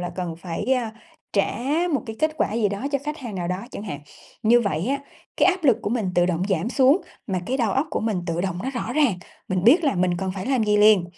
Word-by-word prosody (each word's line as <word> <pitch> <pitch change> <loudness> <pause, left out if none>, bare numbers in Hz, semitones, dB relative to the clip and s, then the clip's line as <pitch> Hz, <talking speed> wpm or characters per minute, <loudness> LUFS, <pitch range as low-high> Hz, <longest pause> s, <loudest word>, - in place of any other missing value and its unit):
là 175 0 -3
cần 175 -3 -3
phải, 170 +3 -5
à, 230 -3 -2 0.4
trả 200 0 +1 0.4
một 260 - 0
cái 220 0 -6
kết 310 0 +2
quả 215 - 0
gì 220 -3 +2
đó 200 +7 -4
cho 280 - +2
khách 300 +1 -4
hàng 235 -7 -7
nào 175 -2 -3
đó 180 - 0
chẳng - - -7
hạn. 185 -9 -6 0.4
Như 240 +2 +5
vậy 185 -4 -1
á, 280 0 +1 0.4
cái - - +5
áp 370 -3 +1
lực 245 -5 +5
của 205 - -2
mình 220 -6 0
tự 175 0 +4
động 175 0 0
giảm 190 +3 0
xuống 275 +6 +4 0.3
mà 185 -3 -1
cái 260 +2 0
đầu 230 -6 +1
óc 270 +4 +1
của - - -1
mình 215 -5 -1
tự 170 +1 -1
động 185 -2 -2
nó 265 - -2
rõ 245 -2 -4
ràng, 290 -9 +3 0.3
mình 185 -1 -1
biết 315 +8 +6
là 280 - +2
mình 180 -1 +1
cần 190 -1 -2
phải 190 +4 -5
làm 260 -5 +2
gì 210 0 +3
liền. 210 -4 +6
210 Hz, 270 wpm, -23 LUFS, 185-255 Hz, 0.4 s, biết